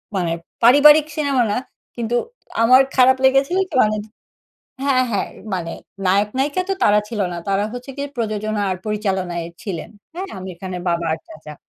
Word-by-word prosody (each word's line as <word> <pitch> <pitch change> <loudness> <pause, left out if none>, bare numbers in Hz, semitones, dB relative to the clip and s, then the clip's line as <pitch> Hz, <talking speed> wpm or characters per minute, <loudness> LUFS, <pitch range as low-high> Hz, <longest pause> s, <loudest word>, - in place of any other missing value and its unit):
মানে 175 -3 0 0.3
পারিবারিক 295 +5 +7
সিনেমা 280 -5 +1
না। - - 0 0.4
কিন্তু 235 0 -2 0.5
আমার 255 +3 +7
খারাপ 260 0 +5
লেগেছিল 270 +6 +3
কি? - - -6
মানে 215 0 +1
য - - -13 0.8
হ্যাঁ, 255 -2 +3
হ্যাঁ 205 - -1 0.3
মানে 165 -2 -4 0.3
নায়ক-নায়িকা 255 - +1
তো 390 - +2
তারা 205 0 +5
ছিল 220 -2 -4
না। 175 - -5
তারা 195 +1 +1
হচ্ছে 245 +2 -7
গিয়ে 280 0 -4
প্রযোজনা 215 -2 -2
আর 185 - -1
পরিচালনায় 190 -5 -2 0.2
ছিলেন। 185 -4 -5 0.3
হ্যাঁ? 370 +3 -4
আমির 185 -2 -8
খানের 185 -2 -5
বাবা 170 0 0
আর 160 - -2
চাচা। 155 -1 -11
215 Hz, 165 wpm, -20 LUFS, 185-265 Hz, 0.8 s, পারিবারিক